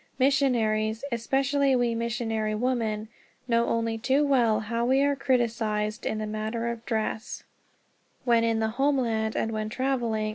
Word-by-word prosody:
Missionaries, 235 -5 +1
especially 270 +3 +1
we 240 -1 +1
missionary 225 -2 -2
women, 220 -2 -1 0.4
know 235 -1 +2
only 230 -1 -1
too 270 +5 +2
well 235 -6 +3
how 230 +2 -2
we 265 +3 +3
are 285 0 +2
criticized 225 -5 0
in 215 - -1
the 215 - -3
matter 215 +2 -3
of 235 -1 -5
dress, 220 -1 -3 0.8
when 235 -2 +4
in 230 -1 +1
the 220 0 0
homeland 235 -6 +1
and 225 - -1
when 215 -1 -3
traveling. 235 -4 -1
230 Hz, 145 wpm, -27 LUFS, 220-255 Hz, 0.8 s, when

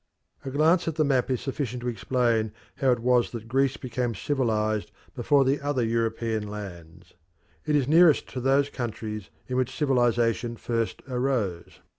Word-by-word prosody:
A 135 - -4
glance 160 +6 +3
at 165 - -1
the 155 -1 +2
map 135 -3 +1
is 130 -2 0
sufficient 130 -3 -4
to - - -3
explain 120 -2 0 0.2
how 135 - +2
it 120 -2 0
was 125 0 +3
that 115 -2 -8
Greece 135 +2 +1
became 125 -2 -3
civilised 110 -5 -1 0.2
before 135 +2 +3
the 135 +3 +1
other 140 -4 0
European 115 -1 -1
lands. 90 -5 -9 0.5
It 150 - +2
is 140 -3 +2
nearest 160 0 +5
to 125 - -5
those 140 +2 +2
countries 110 -4 -5 0.2
in 125 - -2
which 130 -1 -1
civilisation 120 -4 +1
first 115 -1 -2
arose. 125 -9 -2
125 Hz, 160 wpm, -26 LUFS, 115-135 Hz, 0.5 s, nearest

